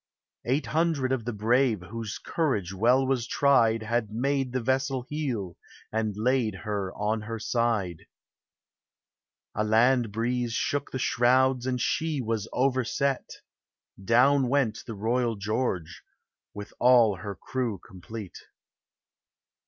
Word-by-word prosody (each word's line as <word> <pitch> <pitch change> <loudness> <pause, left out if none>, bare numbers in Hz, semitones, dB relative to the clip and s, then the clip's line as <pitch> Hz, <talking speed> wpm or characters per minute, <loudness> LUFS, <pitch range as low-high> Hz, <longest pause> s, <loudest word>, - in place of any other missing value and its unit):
Eight 135 +5 0
hundred 155 -5 0
of 125 -4 -1
the 120 - -2
brave, 115 -1 +1
Whose 110 +3 -6
courage 105 - -1
well 120 +7 +3
was 130 -3 0
tried, 115 -6 +3
Had 115 -1 -1
made 135 +3 -1
the 130 - -1
vessel 130 +1 0
heel, 125 - -3 0.3
And 110 -2 -1
laid 120 -2 +1
her 100 -3 -2
on 105 +1 -1
her 115 +2 -5
side. 110 -6 -1 1.5
A 105 - 0
land 115 +2 +3
breeze 120 +2 -1
shook 140 +4 -1
the - - -4
shrouds, 125 +1 +2
And 125 -1 -1
she 160 +3 0
was 115 -4 -2
overset; 130 +1 0 0.7
Down 130 +5 +4
went 130 -5 +1
the 115 - -5
Royal 115 +3 0
George, 100 -5 -2 0.5
With 105 0 -9
all 120 -5 +5
her 100 +2 -6
crew 120 +2 -3
complete. 95 +2 -10
120 Hz, 125 wpm, -27 LUFS, 105-130 Hz, 1.5 s, all